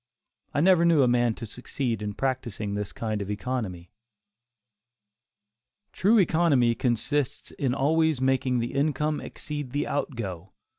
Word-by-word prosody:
I 145 Hz, -, +1 dB
never 180 Hz, 0 st, +5 dB
knew 165 Hz, -5 st, +5 dB
a -, -, +4 dB
man 120 Hz, -2 st, +2 dB
to 115 Hz, -, -7 dB
succeed 125 Hz, +1 st, -3 dB
by 105 Hz, -1 st, -3 dB
practising 120 Hz, -6 st, -2 dB
this 105 Hz, -1 st, -3 dB
kind 110 Hz, -2 st, -3 dB
of 100 Hz, -, -5 dB
economy. 105 Hz, -5 st, -4 dB, 2.0 s
True 215 Hz, +5 st, +3 dB
economy 160 Hz, -, +3 dB
consists 125 Hz, +4 st, -1 dB
in 130 Hz, -2 st, -1 dB
always 160 Hz, +1 st, +2 dB
making 130 Hz, -1 st, +1 dB
the 120 Hz, 0 st, -2 dB
income 150 Hz, +1 st, 0 dB
exceed 145 Hz, -4 st, -6 dB
the 145 Hz, -, 0 dB
out 145 Hz, -1 st, -2 dB
go. 95 Hz, -5 st, -6 dB
130 Hz, 140 wpm, -26 LUFS, 115-145 Hz, 2.0 s, never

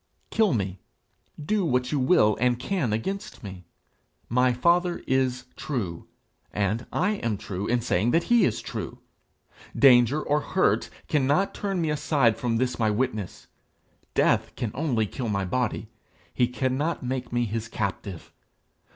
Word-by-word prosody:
Kill 220 Hz, -3 st, +3 dB
me; 95 Hz, -6 st, -2 dB, 0.6 s
do 205 Hz, +7 st, 0 dB
what 125 Hz, -5 st, 0 dB
you 150 Hz, -, +1 dB
will 130 Hz, -6 st, +4 dB
and 125 Hz, 0 st, +2 dB
can 145 Hz, -, -1 dB
against 160 Hz, -, -4 dB
me; 95 Hz, -3 st, -9 dB, 0.6 s
my 125 Hz, +2 st, +3 dB
father 170 Hz, +7 st, +2 dB
is 130 Hz, -1 st, 0 dB
true, 100 Hz, -, -4 dB, 0.4 s
and 105 Hz, +4 st, -1 dB
I 205 Hz, +3 st, +1 dB
am 110 Hz, -, -2 dB
true 95 Hz, +1 st, -5 dB
in 120 Hz, 0 st, +1 dB
saying 110 Hz, -1 st, +1 dB
that 165 Hz, +7 st, +3 dB
he 240 Hz, -2 st, +4 dB
is 115 Hz, -, +1 dB
true. -, -, -5 dB, 0.8 s
Danger 130 Hz, +1 st, +6 dB
or 150 Hz, +1 st, +1 dB
hurt -, -, +1 dB, 0.2 s
cannot 150 Hz, +6 st, +2 dB
turn 195 Hz, -3 st, -2 dB
me 160 Hz, -2 st, 0 dB
aside 145 Hz, -6 st, +2 dB
from 115 Hz, -2 st, -1 dB
this 125 Hz, +1 st, -1 dB
my 110 Hz, -2 st, +2 dB
witness. 110 Hz, -3 st, -2 dB, 0.7 s
Death -, -, +2 dB
can 115 Hz, -4 st, -3 dB
only 130 Hz, -7 st, 0 dB
kill 120 Hz, +3 st, -4 dB
my 100 Hz, -2 st, -1 dB
body; 120 Hz, +5 st, -1 dB, 0.5 s
he 125 Hz, -, +2 dB
cannot 130 Hz, +6 st, -1 dB
make 130 Hz, 0 st, -3 dB
me 120 Hz, 0 st, +1 dB
his 110 Hz, +1 st, -3 dB
captive. 100 Hz, -4 st, -5 dB
125 Hz, 150 wpm, -26 LUFS, 110-150 Hz, 0.8 s, Danger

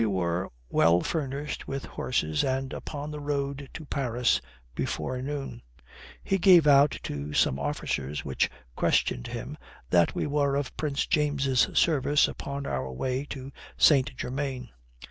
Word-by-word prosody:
We 115 Hz, -, +3 dB
were 90 Hz, -2 st, -1 dB, 0.2 s
well 85 Hz, +6 st, +4 dB
furnished 145 Hz, -2 st, -3 dB
with 135 Hz, 0 st, -4 dB
horses 75 Hz, -12 st, -1 dB
and 130 Hz, 0 st, -1 dB
upon 145 Hz, 0 st, -6 dB
the 150 Hz, -, -5 dB
road 140 Hz, -1 st, -3 dB
to 160 Hz, -, -7 dB
Paris 125 Hz, -4 st, +1 dB, 0.3 s
before 125 Hz, 0 st, -3 dB
noon. 135 Hz, -3 st, -5 dB, 0.6 s
He 195 Hz, -, +1 dB
gave 180 Hz, -4 st, +7 dB
out 145 Hz, 0 st, +5 dB
to 75 Hz, +1 st, -5 dB
some 65 Hz, -, +2 dB
officers 70 Hz, 0 st, -3 dB
which 65 Hz, -, +1 dB, 0.3 s
questioned -, -, +1 dB
him -, -, -6 dB, 0.3 s
that 85 Hz, -1 st, +4 dB
we -, -, -1 dB
were 145 Hz, -1 st, +1 dB
of 140 Hz, -2 st, -2 dB
Prince 145 Hz, -2 st, -1 dB
James's 140 Hz, -4 st, +2 dB
service 145 Hz, -2 st, +4 dB
upon 140 Hz, 0 st, -5 dB
our 65 Hz, -, -3 dB
way 130 Hz, -, -2 dB
to 135 Hz, -1 st, -7 dB, 0.3 s
St. 135 Hz, -4 st, +4 dB
Germain. 130 Hz, 0 st, -4 dB
135 Hz, 145 wpm, -27 LUFS, 105-145 Hz, 0.6 s, gave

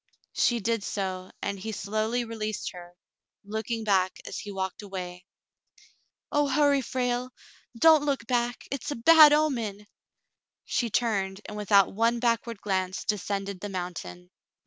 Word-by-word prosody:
She 240 Hz, -1 st, +2 dB
did 230 Hz, +1 st, 0 dB
so, 185 Hz, -3 st, -3 dB
and 200 Hz, -1 st, -2 dB
he 220 Hz, +3 st, -5 dB
slowly 215 Hz, +4 st, -1 dB
released 215 Hz, -2 st, -4 dB
her, 175 Hz, 0 st, -12 dB, 0.5 s
looking 220 Hz, +2 st, -3 dB
back 190 Hz, -3 st, +2 dB
as -, -, -5 dB
he 205 Hz, -, -7 dB
walked 190 Hz, 0 st, -4 dB
away. 180 Hz, -3 st, -7 dB, 1.1 s
"Oh, 290 Hz, 0 st, +2 dB
hurry, 280 Hz, 0 st, +3 dB
Frale! 245 Hz, 0 st, -1 dB, 0.5 s
Don't 315 Hz, +2 st, +6 dB
look 275 Hz, -5 st, -1 dB
back. 240 Hz, 0 st, -1 dB
It's 275 Hz, +2 st, -4 dB
a 290 Hz, -, -2 dB
bad 310 Hz, +5 st, +8 dB
omen." 235 Hz, -10 st, 0 dB, 0.8 s
She 240 Hz, -4 st, 0 dB
turned, 200 Hz, -4 st, 0 dB
and 210 Hz, -, -7 dB
without 200 Hz, -2 st, +3 dB
one 230 Hz, +3 st, +2 dB
backward 230 Hz, -2 st, 0 dB
glance 185 Hz, -2 st, -2 dB
descended 200 Hz, -2 st, -2 dB
the 205 Hz, -, -5 dB
mountain. 165 Hz, -, -6 dB
215 Hz, 140 wpm, -27 LUFS, 195-245 Hz, 1.1 s, bad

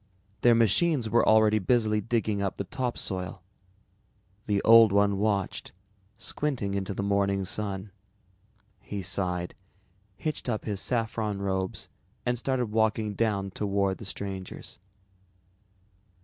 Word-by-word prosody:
Their 120 Hz, -1 st, +6 dB
machines 115 Hz, -, +2 dB
were 120 Hz, -, +4 dB
already 110 Hz, 0 st, +5 dB
busily 105 Hz, 0 st, +2 dB
digging 110 Hz, -2 st, -1 dB
up 100 Hz, -1 st, -2 dB
the -, -, -2 dB
topsoil. 95 Hz, -6 st, -4 dB, 1.0 s
The 100 Hz, -1 st, +2 dB
Old 115 Hz, -2 st, +8 dB
One 100 Hz, 0 st, +3 dB
watched, 100 Hz, -2 st, -1 dB, 0.4 s
squinting 120 Hz, -6 st, -2 dB
into 100 Hz, 0 st, -3 dB
the 100 Hz, -, -2 dB
morning 100 Hz, -1 st, +1 dB
sun. 100 Hz, 0 st, -3 dB, 0.9 s
He 100 Hz, 0 st, -6 dB
sighed, 90 Hz, -1 st, -1 dB, 0.6 s
hitched 155 Hz, -1 st, -4 dB
up 110 Hz, -3 st, -2 dB
his 105 Hz, -3 st, -2 dB
saffron 110 Hz, -4 st, -1 dB
robes 95 Hz, -1 st, -2 dB, 0.4 s
and 120 Hz, -, +1 dB
started 125 Hz, -3 st, -1 dB
walking 110 Hz, -1 st, +1 dB
down 100 Hz, -3 st, -1 dB
toward 100 Hz, -1 st, -1 dB
the 110 Hz, -, -8 dB
strangers. 95 Hz, -1 st, -6 dB
105 Hz, 120 wpm, -28 LUFS, 100-115 Hz, 1.0 s, Old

